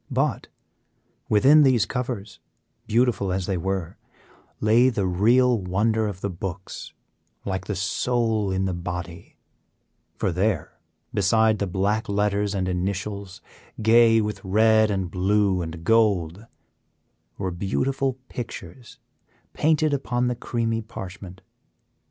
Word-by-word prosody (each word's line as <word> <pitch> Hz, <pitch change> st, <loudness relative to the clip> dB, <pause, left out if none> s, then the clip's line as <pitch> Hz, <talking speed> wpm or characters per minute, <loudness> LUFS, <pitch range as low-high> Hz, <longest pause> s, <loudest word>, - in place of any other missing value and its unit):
But -, -, -1 dB, 0.8 s
within 135 Hz, +9 st, +6 dB
these 130 Hz, -6 st, +4 dB
covers, 120 Hz, -6 st, -5 dB, 0.5 s
beautiful 110 Hz, -4 st, +1 dB
as 95 Hz, 0 st, -1 dB
they 95 Hz, -, -1 dB
were, 95 Hz, -1 st, -3 dB, 0.6 s
lay 115 Hz, +4 st, +4 dB
the 105 Hz, -6 st, -1 dB
real 115 Hz, +7 st, +3 dB
wonder 105 Hz, +4 st, 0 dB
of 95 Hz, -3 st, -6 dB
the 100 Hz, -, -2 dB
books, 90 Hz, +1 st, -7 dB, 0.5 s
like 95 Hz, -1 st, -3 dB
the 105 Hz, -, -2 dB
soul 110 Hz, +2 st, 0 dB
in 95 Hz, 0 st, 0 dB
the 95 Hz, -, -1 dB
body; 85 Hz, -1 st, -6 dB, 0.8 s
for 95 Hz, -, 0 dB
there, 90 Hz, -1 st, -1 dB, 0.3 s
beside 110 Hz, +2 st, +3 dB
the 100 Hz, -, -1 dB
black 100 Hz, +5 st, -1 dB
letters 100 Hz, 0 st, 0 dB
and 95 Hz, -1 st, -1 dB
initials, 100 Hz, +1 st, -3 dB, 0.4 s
gay 115 Hz, +1 st, +5 dB
with 105 Hz, -2 st, -4 dB
red 110 Hz, +2 st, +4 dB
and 95 Hz, -4 st, -2 dB
blue 95 Hz, 0 st, +1 dB
and 80 Hz, 0 st, -6 dB
gold, 105 Hz, -3 st, +1 dB, 0.9 s
were 95 Hz, -2 st, -3 dB
beautiful 130 Hz, +9 st, -1 dB
pictures 115 Hz, -1 st, -8 dB, 0.6 s
painted 155 Hz, -1 st, +2 dB
upon 125 Hz, -3 st, -1 dB
the 125 Hz, 0 st, 0 dB
creamy 115 Hz, -1 st, -2 dB
parchment. 95 Hz, -3 st, -9 dB
100 Hz, 120 wpm, -24 LUFS, 95-115 Hz, 0.9 s, within